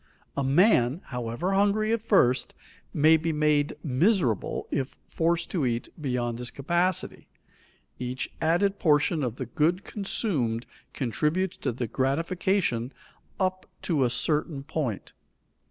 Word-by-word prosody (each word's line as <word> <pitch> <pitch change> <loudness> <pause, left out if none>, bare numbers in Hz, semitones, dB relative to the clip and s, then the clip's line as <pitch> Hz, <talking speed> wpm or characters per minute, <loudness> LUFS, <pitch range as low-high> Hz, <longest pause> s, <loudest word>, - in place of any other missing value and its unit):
A 140 - 0
man, 140 - +4
however 125 +7 -3
hungry 205 +2 +2
at 230 - 0
first, 160 - +2 0.4
may 155 +2 +5
be 160 +1 -1
made 150 -1 +2
miserable 145 - +1
if 135 -1 -2
forced 170 +1 0
to 170 -6 0
eat 120 -2 -1
beyond 120 -4 -2
his 125 0 -2
capacity. 175 +5 -1 0.7
Each 125 +1 -3
added 185 +5 +2
portion 150 0 +3
of 120 -4 -2
the 130 - -4
good 160 - +1
consumed 145 - -1 0.3
contributes 150 - -1
to - - -2
the 120 +1 -3
gratification 140 - 0 0.5
up 185 -1 -1 0.2
to 155 -7 +1
a 125 - +2
certain 150 +3 -1
point. 140 -8 -3
150 Hz, 125 wpm, -27 LUFS, 125-180 Hz, 0.7 s, may